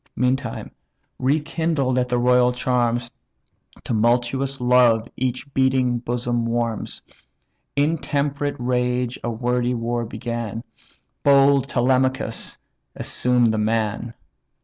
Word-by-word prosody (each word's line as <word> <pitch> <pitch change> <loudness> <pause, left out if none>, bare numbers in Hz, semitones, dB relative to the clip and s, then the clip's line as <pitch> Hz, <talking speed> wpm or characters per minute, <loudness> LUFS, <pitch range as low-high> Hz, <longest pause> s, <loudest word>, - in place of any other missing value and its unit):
Meantime, 125 -1 -1 0.5
rekindled 150 -1 0
at 125 0 -1
the 125 - +1
royal 125 0 +4
charms, 120 -1 0 0.7
Tumultuous 120 +4 0
love 125 -2 +4
each 130 +2 -3
beating 130 -2 +2
bosom 120 0 -2
warms; 115 -1 -2 0.7
Intemperate 145 -1 0
rage 125 0 -1
a 120 - -1
wordy 125 +1 0
war 120 0 -2
began; 115 -2 -5 0.6
But 140 -1 +6
bold 140 -1 +2
Telemachus 130 -2 0 0.4
assumed 120 -2 +2
the 110 - 0
man. 110 +1 -1
125 Hz, 100 wpm, -22 LUFS, 120-130 Hz, 0.7 s, But